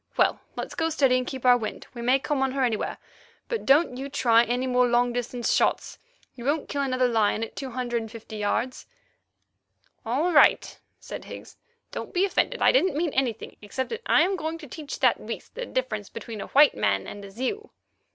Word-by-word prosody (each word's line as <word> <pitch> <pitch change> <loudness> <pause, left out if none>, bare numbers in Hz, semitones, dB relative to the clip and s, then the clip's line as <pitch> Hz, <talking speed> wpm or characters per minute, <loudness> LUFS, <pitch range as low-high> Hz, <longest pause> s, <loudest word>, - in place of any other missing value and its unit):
Well, - - +3 0.2
let's - - -5
go 325 -1 0
steady 270 -5 +3
and 255 - -4
keep 260 -2 -6
our 250 -1 +7
wind. 215 -2 -5
We 240 - -7
may 250 +3 +4
come 275 0 -2
on 265 -1 +1
her 270 -1 0
anywhere, 230 -4 -1 0.5
but 465 -3 -4
don't 275 -1 +4
you 275 +2 -5
try 235 -4 +4
any 245 +2 -1
more 250 -1 +3
long 240 0 +2
distance 245 0 -1
shots. - - 0 0.3
You 240 - -10
won't 290 +3 0
kill 285 - -2
another 255 -2 +1
lion 220 -2 +1
at 225 - -7
two 270 -2 -5
hundred 240 -1 -2
and 225 -1 -8
fifty 225 -1 -9
yards." 230 +5 -2 1.2
"All 290 +10 0
right," - - +4 0.2
said - - -8
Higgs, - - -10 0.4
"don't - - -7
be 365 +2 +4
offended. 485 +5 0
I - - +6
didn't 375 - +2
mean 325 -2 0
anything, 250 -5 -2
except 235 +6 -4
that 460 +1 -4
I - - +5
am 380 +2 0
going 320 0 -3
to 315 -2 -11
teach 295 +3 -7
that - - +3
beast - - -7
the - - -5
difference 220 -6 -3
between 225 -4 -7
a - - -6
white 290 +1 +6
man 100 -1 0
and 205 - -8
a 200 - -9
Zeu." 260 - -4
255 Hz, 210 wpm, -26 LUFS, 235-295 Hz, 1.2 s, our